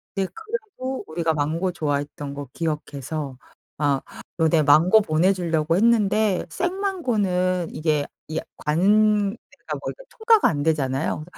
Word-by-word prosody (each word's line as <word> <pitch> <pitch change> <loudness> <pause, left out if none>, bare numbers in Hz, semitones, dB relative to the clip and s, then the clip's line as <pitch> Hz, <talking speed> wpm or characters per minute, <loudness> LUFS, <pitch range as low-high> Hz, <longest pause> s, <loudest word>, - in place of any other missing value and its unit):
근데 195 -1 -1
그리고 430 - -5
우리가 160 0 0
망고 160 +5 -1
좋아했던 145 -2 -3
거 140 -2 -7
기억해서 150 -3 -4 0.4
아 145 -2 +1 0.4
너네 160 -1 +3
망고 170 +9 +6
보내주려고 165 -2 +1
했는데 215 -2 +2
쌩 360 - -2
망고는 200 - 0
이게 150 -2 0 0.2
이게 155 - -3 0.2
관 205 +6 +3
내가 215 - -8
뭐 - - -4 0.2
통과가 445 -1 +4
안 145 -3 -2
되잖아요. 145 -1 0
170 Hz, 275 characters per minute, -23 LUFS, 150-215 Hz, 0.4 s, 망고